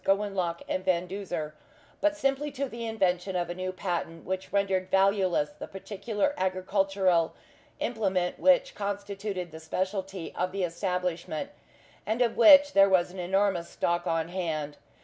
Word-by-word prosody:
Gowanlock 195 -4 0
and 185 - -2
Van 180 -1 +1
Duzer, 175 -5 -4 0.5
but 305 0 +2
simply 275 +1 0
to 275 +1 -2
the 235 -2 -6
invention 190 -4 0
of 175 -1 -1
a - - -2
new 185 +1 -3
patent 175 -3 -4
which 190 0 -4
rendered 190 -2 +1
valueless 190 -5 +2
the - - -9
particular 205 +7 -2
agricultural 185 -2 +1 0.4
implement 190 -6 -1
which 275 -2 +4
constituted 200 -2 -4
the 160 - -9
specialty 190 +2 -3
of 180 +1 -2
the 195 -1 -1
establishment, 180 - -2 0.5
and 225 +3 +1
of 235 - 0
which 285 +5 +8
there 195 0 +6
was 180 -2 +3
an 185 - -9
enormous 190 -1 +1
stock 175 0 -1
on 165 0 0
hand. 155 -5 -3
190 Hz, 150 wpm, -28 LUFS, 175-205 Hz, 0.5 s, which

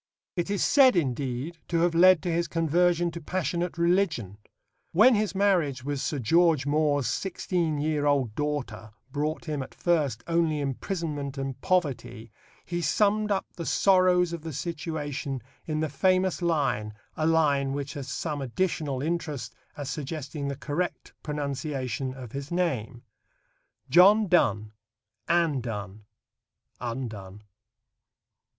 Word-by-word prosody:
It 175 +1 -2
is 200 -1 0
said, 265 -5 +6
indeed, 140 +1 -2
to 170 -1 +1
have 175 0 +2
led 180 0 +6
to 175 - -1
his 170 0 0
conversion 170 +2 +2
to 170 +1 -7
passionate 175 +1 -2
religion. 170 - +1 0.5
When 225 +9 +7
his 210 -2 0
marriage 175 -10 +2
with 140 0 -3
Sir 150 - -2
George 160 +3 +3
More's 145 -2 +2
sixteen 175 -4 -1
year 150 0 0
old 135 -6 +1
daughter 125 -7 -4 0.2
brought 150 +3 -2
him 150 -3 -2
at 130 - -9
first 150 -10 0
only 165 -2 +1
imprisonment 145 0 -3
and 135 -1 -4
poverty, 140 - -1 0.3
he 175 0 -3
summed 210 +3 +2
up 195 -2 0
the 170 - -5
sorrows 180 -2 +4
of 170 - -5
the 160 0 -6
situation 145 -4 -4 0.3
in 155 -1 -1
the 160 - +1
famous 185 +2 +1
line 135 -11 0 0.2
a 155 - 0
line 145 -4 +2
which 140 0 -4
has 140 -2 -6
some 145 +3 -3
additional 140 -1 -1
interest 150 -8 -3 0.2
as 145 -2 -5
suggesting 150 0 -5
the 140 - -2
correct 145 +6 -4
pronunciation 140 -4 -3
of 125 -4 -9
his 140 +2 -6
name: 130 -9 -1 0.8
John 195 +9 +6
Donne; 110 - +2 0.6
Anne 165 -6 +2
Donne; 105 -3 -6 0.7
Undone. 110 -5 -6
150 Hz, 135 wpm, -27 LUFS, 135-175 Hz, 0.8 s, When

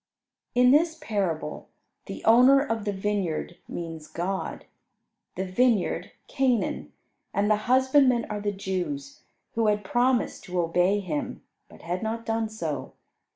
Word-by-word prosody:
In 250 0 +6
this 325 +3 +3
parable 190 - -3 0.4
the - - -7
owner 250 +5 +7
of 225 -6 -2
the 205 - 0
vineyard 190 -4 -2
means 165 -2 -6
God; 190 +3 -4 0.7
the 190 - -2
vineyard 210 +1 +1 0.2
Canaan, 255 -4 0 0.4
and 205 +1 +2
the 210 - +4
husbandmen 260 -2 +4
are 210 -1 -4
the 205 0 0
Jews, 275 +10 -4 0.3
who 225 -1 +1
had 210 0 +1
promised 245 +4 +1
to 180 -1 -2
obey 180 +4 +2
Him, 155 -6 -4 0.3
but - - -16
had 175 +2 -3
not 225 +1 -3
done 225 -1 -1
so. 155 -11 -4
210 Hz, 135 wpm, -26 LUFS, 185-250 Hz, 0.7 s, owner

